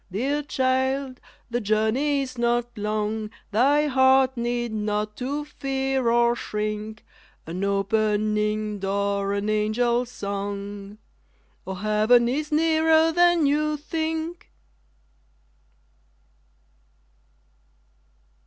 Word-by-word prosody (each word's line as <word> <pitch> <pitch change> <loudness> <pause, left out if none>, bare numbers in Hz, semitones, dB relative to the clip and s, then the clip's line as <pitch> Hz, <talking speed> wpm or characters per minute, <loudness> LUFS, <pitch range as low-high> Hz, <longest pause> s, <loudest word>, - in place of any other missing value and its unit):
_ - - -39
Dear 270 +9 -1
child, 260 -1 -1 0.3
the 240 +1 -1
journey 225 +7 +1
is 255 -1 -8
not 240 0 0
long, 215 0 -2 0.2
Thy 280 +8 +3
heart 265 -1 +4
need 240 -1 -2
not 210 0 -2
to 285 +4 -3
fear 270 -3 -1
or 235 0 +3
shrink 215 0 -4 0.4
_An 175 +4 -5
opening 210 +1 0
door, 200 0 -1
an 200 +1 -2
angel's 235 +3 +1
song 200 -1 -5 0.7
_ - - -3
_Oh, 190 0 -6
heaven 215 +3 +3
is 300 +5 -2
nearer 320 +1 +3
than 345 -1 +4
you 300 +1 +1
think! 320 +2 -4
235 Hz, 95 wpm, -24 LUFS, 210-275 Hz, 0.7 s, heart